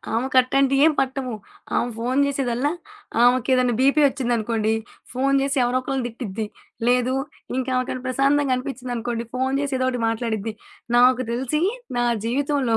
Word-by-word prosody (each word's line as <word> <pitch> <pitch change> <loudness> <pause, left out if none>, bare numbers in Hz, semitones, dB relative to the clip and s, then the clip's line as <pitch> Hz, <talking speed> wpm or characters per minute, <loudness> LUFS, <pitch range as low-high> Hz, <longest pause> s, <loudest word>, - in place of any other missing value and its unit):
ఆమెకు 260 +3 0
అట్టాంటియేం 275 +4 +4
పట్టవు. 265 -2 -1 0.4
ఆమె 245 - +1
ఫోను 255 +4 +1
చేసేదల్లా 275 0 0 0.5
ఆమెకెదైన్న 250 0 +3
బీపీ 275 +3 +4
ఒచ్చిందనుకోండి. 230 -4 0 0.4
ఫోను 275 +2 +1
చేసి 275 0 0
ఎవరో 245 +1 +1
ఒకకళ్ళని 265 -1 -2
తిట్టిద్ది. 225 -3 -5 0.4
లేదు, 250 +1 +3 0.4
ఇంకా 260 0 -1
ఆమెకేమన్న 255 0 -2
ప్రశాంతంగా 275 +1 +2
అనిపించిందనుకోండి, 245 -3 -4
ఫోను 260 +1 0
చేసి 280 -2 -2
ఏదో 255 - 0
ఒకటి 250 -2 -3
మాట్లాడిద్ది. 225 -1 -2 0.4
నాకు 250 +1 +5
తెలిసి, 260 +6 -1 0.4
నా 240 - +2 0.2
జీవితంలో 270 -1 +1
255 Hz, 130 wpm, -23 LUFS, 240-270 Hz, 0.5 s, నాకు